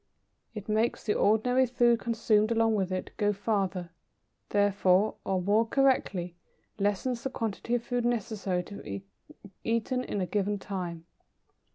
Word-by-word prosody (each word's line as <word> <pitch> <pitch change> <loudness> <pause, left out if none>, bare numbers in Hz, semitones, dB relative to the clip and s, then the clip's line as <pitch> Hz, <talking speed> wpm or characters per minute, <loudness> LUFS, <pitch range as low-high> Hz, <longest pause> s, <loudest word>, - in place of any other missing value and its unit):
It 205 -1 -7
makes 220 +2 +1
the 210 - +1
ordinary 250 +5 +3
food 240 -1 +3
consumed 220 -1 +2
along 225 -1 +3
with 195 -3 0
it, 185 0 -3
go 205 -1 +2
farther, 195 -4 -1 0.6
therefore, 200 0 +3
or, 190 -1 0
more 210 +4 +4
correctly, 215 -10 +1 0.4
lessens 205 +5 0
the 270 - -2
quantity 230 0 -2
of 235 - -1
food 245 0 -1
necessary 215 -6 -1
to 200 +2 -9
be 100 -1 -6 0.6
eaten 230 +3 0
in 205 - -3
a 185 - 0
given 205 +2 0
time. 180 -4 -5
210 Hz, 145 wpm, -29 LUFS, 195-230 Hz, 0.6 s, more